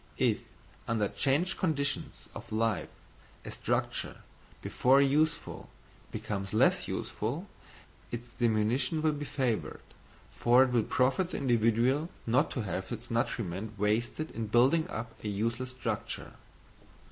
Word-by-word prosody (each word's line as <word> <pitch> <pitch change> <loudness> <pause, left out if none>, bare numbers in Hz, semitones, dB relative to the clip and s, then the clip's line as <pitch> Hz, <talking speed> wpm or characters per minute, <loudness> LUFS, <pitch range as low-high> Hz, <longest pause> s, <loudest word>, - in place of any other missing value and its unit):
If - - +2 0.5
under 110 -3 +1
changed 145 +7 +1
conditions 145 -5 -1
of - - -9
life 110 -4 0 0.6
a - - -5
structure, - - -2 0.4
before 130 +2 +4
useful, 145 +3 +1 0.4
becomes 100 -1 -4
less - - +4
useful, 140 - -3 0.6
its 120 0 -6
diminution 120 +6 +1
will 155 - +4
be 145 0 -4
favoured, 125 -6 -1 0.5
for 120 +2 +5
it 130 - 0
will 120 -2 +3
profit 135 +8 +2
the - - -4
individual 120 +4 +2 0.2
not 130 +7 +3
to 125 - -3
have 95 -1 -4
its 120 +1 -6
nutriment 110 -2 -2
wasted 115 +9 0
in 115 -1 -4
building 135 - +4
up 115 -3 -5
a - - -3
useless 115 +5 -1
structure. 130 0 -4
120 Hz, 125 wpm, -31 LUFS, 110-140 Hz, 0.6 s, for